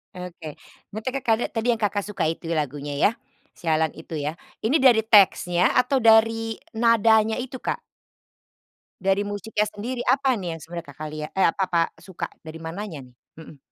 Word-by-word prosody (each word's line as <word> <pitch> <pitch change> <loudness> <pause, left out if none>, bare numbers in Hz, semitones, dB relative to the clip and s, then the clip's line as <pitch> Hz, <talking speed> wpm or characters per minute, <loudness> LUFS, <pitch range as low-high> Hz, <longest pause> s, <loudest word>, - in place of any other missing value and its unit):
Oke, 170 -4 -8 0.4
mete 215 +4 -3
Kakak 245 -4 0
tadi 225 +1 -2
yang 225 - -12
Kakak 205 -1 0
suka 210 - -3
itu 165 +1 -4
lagunya 145 -1 -3
ya, 150 - +3 0.4
"Sialan" 160 -2 0
itu 160 0 -8
ya. 150 +3 -3 0.3
Ini 265 +8 +3
dari 240 -4 +5
teksnya 185 -4 +4
atau 260 +1 +3
dari 225 0 +4 0.2
nadanya 225 -1 +4
itu, 255 0 -5
Kak? - - -2 1.2
Dari 195 +1 +2
musiknya 205 +1 -2
sendiri, 240 +4 -5
apa 270 -1 +3
nih 175 -7 -4
yang - - -14
sebenarnya 170 0 -8
Kakak 150 +2 -7
liat, 150 0 -5
eh 190 - +5
apa 180 - +1
apa 170 -2 +2 0.2
suka 190 -3 -6 0.2
dari 160 0 -9
mananya 165 -3 -7
nih? 125 - -20 0.2
Mhm. 155 -2 -12
200 Hz, 165 wpm, -24 LUFS, 160-225 Hz, 1.2 s, dari